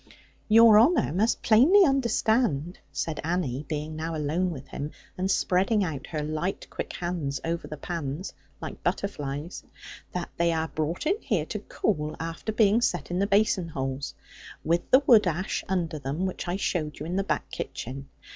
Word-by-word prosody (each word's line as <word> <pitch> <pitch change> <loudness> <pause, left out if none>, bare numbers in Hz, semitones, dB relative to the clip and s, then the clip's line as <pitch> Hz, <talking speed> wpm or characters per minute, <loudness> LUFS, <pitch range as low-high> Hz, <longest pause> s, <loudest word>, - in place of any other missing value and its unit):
'Your 225 -1 +8
honour 260 - +4
must 215 +6 +1
plainly 280 - +6
understand,' 225 - +1
said 160 -2 -3
Annie, 155 -5 -2
being 155 0 -3
now 160 +1 -3
alone 155 +5 0
with 140 -5 -8
him, 145 - -4 0.3
and 185 +1 -1
spreading 195 +3 +2
out 150 -6 -4
her 155 -2 -3
light 155 +5 -3
quick - - -5
hands 170 -6 -3
over 170 +1 -2
the 150 - -7
pans, 165 +1 -4 0.3
like - - -7
butterflies, 150 -4 -3 0.5
'that 180 -1 -4
they 170 0 +3
are 160 0 -1
brought 155 - -2
in 390 +7 +1
here 200 - 0
to 210 - -4
cool, 155 -7 -2
after 165 +6 -4
being 215 +1 +4
set 150 - -1
in 175 - 0
the 200 - +2
basin 200 -3 +2
holes, 135 -2 -4 0.5
with 170 +2 0
the 260 +2 +6
wood 215 -6 +6
ash 180 +3 -1
under 170 -4 -1
them, 145 +6 -2
which 185 0 -4
I 175 - -1
showed 160 -6 -2
you 150 - -6
in 175 +3 -3
the 195 - +1
back - - -2
kitchen. 135 +3 -6
175 Hz, 175 wpm, -27 LUFS, 150-200 Hz, 0.5 s, Your